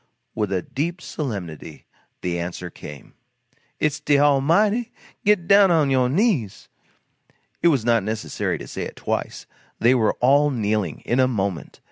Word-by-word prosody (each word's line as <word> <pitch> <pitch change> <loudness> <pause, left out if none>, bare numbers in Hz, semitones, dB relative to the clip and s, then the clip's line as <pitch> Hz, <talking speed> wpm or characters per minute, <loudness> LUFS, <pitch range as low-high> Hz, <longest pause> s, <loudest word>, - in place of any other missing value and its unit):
With 100 -5 -3
deep 170 +6 -2
solemnity 95 - -6 0.4
the 85 -1 -2
answer 85 +1 -5
came: 75 -1 -11 0.7
"It's 150 0 0
de 145 -1 +2
Almighty! 165 - +2 0.3
Git 200 -4 +3
down 200 -1 +6
on 155 -5 +3
yo' 130 -1 +3
knees!" 150 - 0 0.9
It - - +4
was 135 -9 +2
not 115 -2 +3
necessary 110 +2 -3
to - - -9
say - - -6
it - - -6
twice. - - -4 0.3
They 120 +3 +4
were 115 -4 +2
all 140 +4 +3
kneeling, 105 - -1
in 120 - -1
a 130 - +4
moment. 100 -7 -3
130 Hz, 145 wpm, -22 LUFS, 105-155 Hz, 0.9 s, down